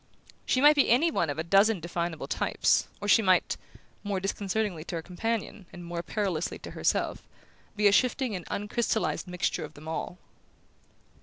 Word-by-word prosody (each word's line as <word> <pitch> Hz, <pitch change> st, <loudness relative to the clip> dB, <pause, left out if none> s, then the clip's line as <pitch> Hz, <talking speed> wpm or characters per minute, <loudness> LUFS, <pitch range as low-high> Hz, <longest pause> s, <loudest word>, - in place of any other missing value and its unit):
She 255 Hz, -, +2 dB
might 295 Hz, +1 st, +7 dB
be 285 Hz, -, +3 dB
any 300 Hz, +8 st, +4 dB
one 170 Hz, -, 0 dB
of 145 Hz, -, -3 dB
a 160 Hz, -, -1 dB
dozen 195 Hz, +4 st, +4 dB
definable 170 Hz, -1 st, -3 dB
types, -, -, +1 dB
or 205 Hz, -, -5 dB
she 215 Hz, -, +6 dB
might 185 Hz, -3 st, +3 dB, 0.5 s
more 200 Hz, -2 st, -1 dB
disconcertingly 195 Hz, -2 st, -2 dB
to 175 Hz, -, -5 dB
her 165 Hz, -, -4 dB
companion 200 Hz, +1 st, -4 dB
and 175 Hz, 0 st, -10 dB
more 170 Hz, 0 st, -4 dB
perilously 185 Hz, -4 st, -2 dB
to -, -, -9 dB
herself -, -, 0 dB, 0.5 s
be 210 Hz, 0 st, 0 dB
a 205 Hz, -, +7 dB
shifting 250 Hz, +1 st, +2 dB
and 180 Hz, -, -5 dB
uncrystallized 215 Hz, 0 st, -1 dB
mixture 180 Hz, -1 st, -1 dB
of 155 Hz, 0 st, -9 dB
them 155 Hz, +2 st, -12 dB
all. 160 Hz, +2 st, -4 dB
195 Hz, 170 wpm, -28 LUFS, 170-220 Hz, 0.5 s, might